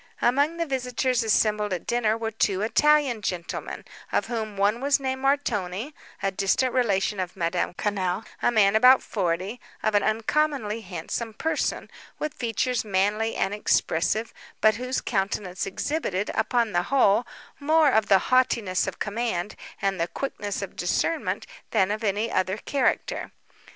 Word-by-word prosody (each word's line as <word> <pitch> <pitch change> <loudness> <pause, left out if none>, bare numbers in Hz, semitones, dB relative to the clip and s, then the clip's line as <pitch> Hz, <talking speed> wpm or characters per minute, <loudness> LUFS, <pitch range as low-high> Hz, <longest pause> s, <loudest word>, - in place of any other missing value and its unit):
Among 285 +7 +2
the 335 - 0
visitors 255 -2 0
assembled 210 -1 +2
at 175 - -4
dinner 225 -2 +1
were 225 -1 -3
two 205 -2 0
Italian 285 0 +3
gentlemen, 180 -4 -4 0.3
of - - +1
whom 220 -4 -4
one 205 +4 +2
was 280 +1 +3
named 265 -1 -3
Montoni, 245 -4 -1 0.3
a 195 - +1
distant 200 +6 +1
relation 205 -5 +1
of 185 -1 -3
Madame 175 0 -1
Quesnel, 195 -1 -1 0.2
a - - +3
man 215 -3 +4
about 250 +4 +7
forty, 190 +3 -2 0.2
of 215 - +1
an 205 - +4
uncommonly 225 0 0
handsome 205 +4 -5
person, 320 - -1 0.3
with 305 - -3
features 245 +1 -1
manly 210 +2 0
and 195 - 0
expressive, 210 +1 0 0.3
but 215 0 +4
whose 255 +1 -2
countenance 195 -3 -2
exhibited, 205 - -2
upon 235 -3 +1
the 175 - +2
whole, 240 -4 +3 0.3
more 310 0 +4
of 220 -3 +2
the 195 - +6 0.2
haughtiness 230 -7 +2
of - - -4
command, 210 -3 -2 0.3
and 195 -3 0
the 170 - +1
quickness 205 - -4
of 195 - -7
discernment, 315 - -1 0.2
than 200 -3 +2
of 215 +2 -3
any 210 +2 0
other 185 +2 0
character. 270 +4 -1
215 Hz, 150 wpm, -25 LUFS, 195-250 Hz, 0.3 s, about